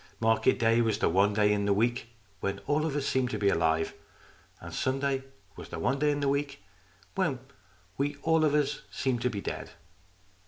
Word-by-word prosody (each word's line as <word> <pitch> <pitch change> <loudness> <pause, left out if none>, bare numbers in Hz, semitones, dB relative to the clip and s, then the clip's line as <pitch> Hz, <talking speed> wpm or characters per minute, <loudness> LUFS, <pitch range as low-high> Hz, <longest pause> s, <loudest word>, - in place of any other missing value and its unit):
Market 115 0 +3
day 115 +1 +3
was 110 -3 +1
the - - +2
one 100 +4 +3
day 105 0 +4
in 100 -1 0
the 100 - +3
week 120 +2 0 0.3
when 100 0 -1
we - - -13
all 150 +2 +1
of 145 - -3
us 145 -2 -1
seemed 130 -2 +1
to 110 - -2
be 100 -1 +2
alive. 80 -2 +1 0.7
And - - -9
Sunday 135 0 -1 0.3
was - - -10
the - - -6
one 130 +11 0
day 150 +1 +3
in 145 0 0
the 140 - +1
week 140 0 -1 0.5
when 185 -9 0 0.6
we 145 +1 0
all 160 -1 +3
of 150 -1 +3
us 145 -1 0
seemed 130 -3 -1
to 125 - +1
be 100 -4 -4
dead. - - -5
125 Hz, 205 wpm, -29 LUFS, 105-140 Hz, 0.7 s, day